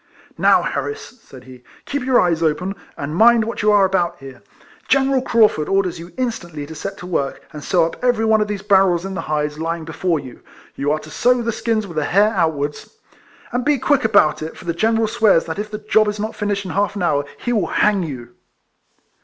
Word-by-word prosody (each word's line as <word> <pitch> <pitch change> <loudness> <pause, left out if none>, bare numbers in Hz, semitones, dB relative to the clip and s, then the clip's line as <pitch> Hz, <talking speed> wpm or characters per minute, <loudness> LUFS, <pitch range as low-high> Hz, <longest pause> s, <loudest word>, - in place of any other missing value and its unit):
" - - -30
Now, - - +4
Harris," 435 - -5
said 130 -9 -14
he, 125 -1 -14
" - - -26
keep 285 0 -3
your 255 -1 +3
eyes 170 -2 +1
open, 165 +4 0 0.2
and 145 +2 -4
mind 230 +3 +5
what 230 - -4
you 210 0 +3
are 205 -2 +5
about 185 -3 0
here. 135 -2 -12 0.5
General 270 -1 +2
Craufurd 215 -11 +2
orders 185 -3 0
you 170 +2 -10
instantly 175 - -4
to 160 - -9
set 195 +5 -6
to 180 - -9
work, 150 -6 -3
and 150 -1 -8
sew 175 -4 +2
up 165 - -7
every 245 -3 +2
one 220 -1 +3
of 210 - 0
these 205 -1 -4
barrels 190 -3 +3
in 195 - -5
the 190 - -3
hides 150 0 -2
lying 165 0 -3
before 165 +1 -1
you. 130 -4 -11 0.3
You 145 +1 -1
are 155 - +1
to 155 0 -11
sew 245 +5 +2
the 230 - -1
skins 225 -1 -1
with 170 -5 -9
the 150 - +1
hair 200 +6 +3
outwards, 160 - -2 0.6
and 245 +1 -1
be 295 +2 +2
quick 285 +2 +1
about 205 -10 +3
it, 160 +1 -6
for - - -12
the 170 - -1
General 225 +5 +1
swears 215 -6 +3
that 165 +4 -5
if 210 0 -4
the 210 - -5
job 215 0 +2
is 210 0 -3
not 215 +2 -4
finished 205 -1 -2
in 185 - -5
half 200 +4 0
an 200 - -3
hour 145 -4 +1
he 240 - -2
will 200 -7 +1
hang 210 -2 +2
you." 130 -8 -6
195 Hz, 230 wpm, -19 LUFS, 160-220 Hz, 0.6 s, mind